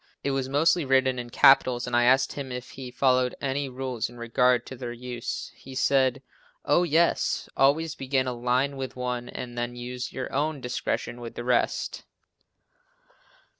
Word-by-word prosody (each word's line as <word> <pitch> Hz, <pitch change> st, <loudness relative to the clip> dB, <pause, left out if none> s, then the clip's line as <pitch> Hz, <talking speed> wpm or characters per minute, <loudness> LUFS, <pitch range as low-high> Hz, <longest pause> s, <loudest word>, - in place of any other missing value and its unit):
It 140 Hz, -, 0 dB
was 135 Hz, -1 st, -1 dB
mostly 155 Hz, +4 st, +3 dB
written 130 Hz, -1 st, +2 dB
in 120 Hz, 0 st, -6 dB
capitals 125 Hz, -1 st, +5 dB
and 125 Hz, -1 st, -2 dB
I 120 Hz, 0 st, +4 dB
asked 130 Hz, +1 st, +4 dB
him 135 Hz, -2 st, -6 dB
if 125 Hz, 0 st, -6 dB
he 130 Hz, -2 st, -8 dB
followed 125 Hz, 0 st, +2 dB
any 140 Hz, 0 st, -2 dB
rule 130 Hz, -2 st, -5 dB
in 120 Hz, -, -14 dB
regard 120 Hz, +1 st, +2 dB
to 130 Hz, -, -8 dB
their 120 Hz, -1 st, -6 dB
use. 120 Hz, 0 st, -5 dB
He 135 Hz, 0 st, -12 dB
said 135 Hz, 0 st, +2 dB, 0.4 s
"Oh, -, -, +4 dB
yes, 170 Hz, 0 st, +1 dB
always 145 Hz, +4 st, +3 dB
begin 130 Hz, 0 st, -1 dB
a 125 Hz, -, -2 dB
line 125 Hz, +3 st, 0 dB
with 130 Hz, -1 st, -5 dB
one 125 Hz, -1 st, -3 dB
and 120 Hz, -1 st, -7 dB
then 120 Hz, 0 st, -3 dB
use 125 Hz, +1 st, -5 dB
your 130 Hz, -, -5 dB
own 150 Hz, +1 st, 0 dB
discretion 125 Hz, -1 st, -3 dB
with 115 Hz, -1 st, -8 dB
the 120 Hz, -, -5 dB
rest." 125 Hz, -1 st, 0 dB
130 Hz, 170 wpm, -26 LUFS, 125-135 Hz, 0.4 s, capitals